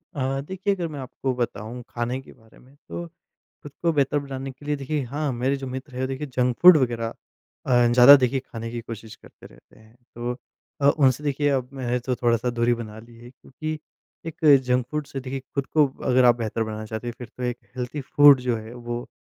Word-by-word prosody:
अ, 135 0 -1
देखिए 190 +6 -2
अगर 175 -3 -3
मैं 145 - -6
आपको 130 0 -3
बताऊँ 120 0 -4
खाने 120 +2 -3
के - - -16
बारे 110 -1 -22
में 130 +3 -21
तो, 170 +4 -8 0.6
खुद 145 - -10
को 170 -1 +3
बेहतर 145 -1 +1
बनाने 135 -1 -5
के 135 +2 -15
लिए 150 0 0
देखिए 140 +1 -2
हाँ, 145 +3 -2
मेरे 130 +3 0
जो 135 -1 -7
मित्र 130 +1 -7
है 130 +1 -1
देखिए 135 +3 -4
जंक 125 -2 0
फूड 180 -1 +10
वग़ैरह 120 -4 0 0.5
अ, 120 -1 +4
ज़्यादा 125 +3 +10
देखिए 130 0 +1
खाने 115 0 -6
की 120 0 -4
कोशिश 115 -1 -9
करते - - -16
रहते - - -20
हैं, 110 +1 -21 0.2
तो 120 +1 -3 0.7
उनसे 130 +3 +3
देखिए 145 0 +1
अब 130 -3 0
मैंने 125 -2 -2
तो 125 +1 -2
थोड़ा-सा 120 0 +1
दूरी 120 0 +1
बना 110 -2 -8
ली 115 +1 -14
है 120 +1 -13
क्योंकि 155 +4 -7 0.5
एक 165 0 -7 0.2
जंक 125 -1 +1
फूड 150 -1 -3
से 135 - -6
देखिए 135 +1 -5
खुद 140 -1 -1
को 150 -2 +3 0.2
अगर 125 0 +4
आप 120 -1 +6
बेहतर 115 -1 -2
बनाना 110 0 -5
चाहते 110 +2 -5
हो - - -3
फिर 120 - -8
तो 125 - -7
एक 125 -1 -2 0.2
हेल्थी 125 +4 -4
फूड 145 0 +6
जो 125 -2 0
है 110 +1 -9
वो 120 0 -5
125 Hz, 215 wpm, -24 LUFS, 120-140 Hz, 0.7 s, फूड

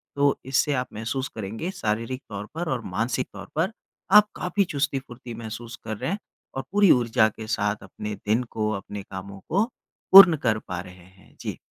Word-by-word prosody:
तो 140 0 +3
इससे 135 +3 +2
आप 125 -1 -1
महसूस 125 +5 -3
करेंगे 110 - -4
शारीरिक 115 - -2
तौर 100 -1 -5
पर 170 0 -2
और 125 - -3
मानसिक 115 +7 -1
तौर 100 0 -9
पर 165 +7 +1 0.4
आप 210 0 +8
काफ़ी 180 +3 +1
चुस्ती-फ़ुर्ती 135 -4 -3
महसूस 115 +1 -7
कर 110 -1 -3
रहे 130 - -2
हैं 200 - -2 0.4
और 135 - -2
पूरी 205 -2 +6
ऊर्जा 115 -3 +4
के 110 +1 -9
साथ 105 -2 -1
अपने 105 +2 -6
दिन 110 +4 +3
को 110 -1 -1
अपने 100 +1 -7
कामों 95 +1 -8
को 195 +6 +3 0.5
पूर्ण 185 -5 +11
कर 110 -1 +2
पा 90 -1 -3
रहे 90 0 -11
हैं। 95 +1 -21
जी। - - -4
115 Hz, 185 wpm, -25 LUFS, 105-140 Hz, 0.5 s, पूर्ण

